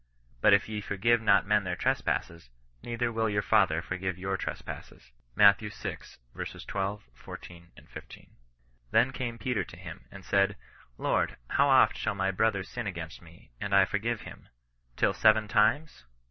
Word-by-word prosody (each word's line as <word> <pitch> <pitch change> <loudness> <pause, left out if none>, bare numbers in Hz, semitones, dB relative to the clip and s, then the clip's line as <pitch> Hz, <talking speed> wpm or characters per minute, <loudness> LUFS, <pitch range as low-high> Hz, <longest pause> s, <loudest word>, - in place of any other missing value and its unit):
But 105 - +6
if 100 - 0
ye 105 -1 -4
for 100 0 -5
give 115 +3 +3
not 100 -4 +4
men 105 0 +2
their 90 -1 -2
trespasses, 85 -4 -2 0.3
neither 120 0 -2
will 110 -1 0
your 100 -1 0
Father 85 -7 +3
forgive 95 0 -3
your 95 +1 -2
trespasses. 80 - -7 0.2
Matt. 100 -1 +7
vi. 105 - -6 0.6
12, 100 +1 -4
14, 85 +6 -11 0.2
15. - - -12 0.3
" - - -38
Then 120 +4 +4
came 120 -2 -4
Peter 120 -5 -1
to 80 - -13
him, 90 +1 -10
and 100 -1 -12
said, 100 0 +2 0.4
Lord, - - 0
how - - +3
oft - - +5
shall - - -1
my 95 0 0
brother 100 0 +1
sin 120 +3 -6
against 85 -4 -6
me, 85 -5 -18
and 100 -1 0
I 100 -1 +6
forgive 110 +3 -2
him? - - -12 0.5
Till - - +2
seven 110 -1 +4
times 110 - +1
100 Hz, 165 wpm, -29 LUFS, 90-110 Hz, 0.6 s, Matt